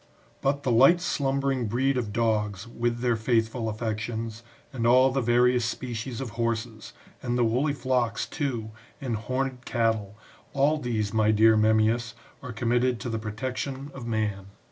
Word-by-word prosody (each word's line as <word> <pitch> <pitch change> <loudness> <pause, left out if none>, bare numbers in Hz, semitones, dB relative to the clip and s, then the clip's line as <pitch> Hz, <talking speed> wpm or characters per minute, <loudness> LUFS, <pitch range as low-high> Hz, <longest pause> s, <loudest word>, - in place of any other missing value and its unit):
But 140 +1 0
the 130 - +1
light 135 +10 +6
slumbering 135 -6 0
breed 130 +5 +1
of 120 -5 -2
dogs, 105 -2 0
with 120 0 -2
their 120 -2 +2
faithful 115 0 0
affections, 110 0 -4 0.3
and 115 -3 0
all 130 +2 +5
the 135 +1 0
various 120 +1 +3
species 115 0 -4
of 130 -4 -5
horses,^ 115 -1 -3 0.3
and 120 0 -1
the 120 - +3
woolly 130 +6 +1
flocks, 125 -3 0
too, 120 -8 -3 0.3
and 130 -5 -2
horned 130 +3 -3
cattle, 110 -5 -1 0.4
all 145 +3 +2
these, 110 -5 -2
my 110 -1 +3
dear 110 +1 +5
Memmi'us, 110 +2 +2 0.3
are 125 - -7
com 115 +1 -3
mitted 125 0 +2
to 120 - -4
the 115 -1 -2
protection 130 +5 -4
of 125 -3 -8
man. 105 -4 -2
120 Hz, 160 wpm, -26 LUFS, 110-130 Hz, 0.4 s, light